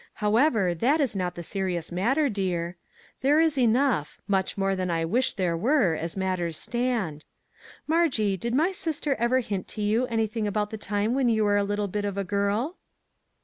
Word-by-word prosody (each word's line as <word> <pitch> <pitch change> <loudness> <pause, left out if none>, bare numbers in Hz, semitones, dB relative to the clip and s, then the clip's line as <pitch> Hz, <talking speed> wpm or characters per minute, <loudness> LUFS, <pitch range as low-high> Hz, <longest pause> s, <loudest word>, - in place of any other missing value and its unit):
However, 215 - +2
that 255 - +2
is 270 -8 0
not 180 -2 -2
the 175 - -6
serious 180 -2 -3
matter, 250 - +2
dear; 180 -6 -2 0.5
there 285 +4 +4
is 320 -2 +3
enough, 245 - +1
much 195 -1 0
more 195 0 +1
than 185 -1 -2
I 165 -1 0
wish 245 +10 +1
there 180 -4 0
were, 225 - +2
as 165 +3 -4
matters 180 -4 -1
stand. 235 -11 -2 0.6
Margie, 300 - +2
did 235 +6 -3
my 320 +7 +3
sister 315 -6 -1
ever 245 +3 +2
hint 200 -5 -4
to 215 - -6
you 225 +5 +1
anything 225 -2 -1
about 210 0 -1
the 220 - -4
time 205 +3 0
when 260 -2 +2
you 220 -1 +2
were 205 -1 +3
a 205 - +2
little 205 0 -1
bit 205 +2 -3
of 200 -1 -3
a 200 - 0
girl 205 - -1
210 Hz, 190 wpm, -26 LUFS, 185-250 Hz, 0.6 s, there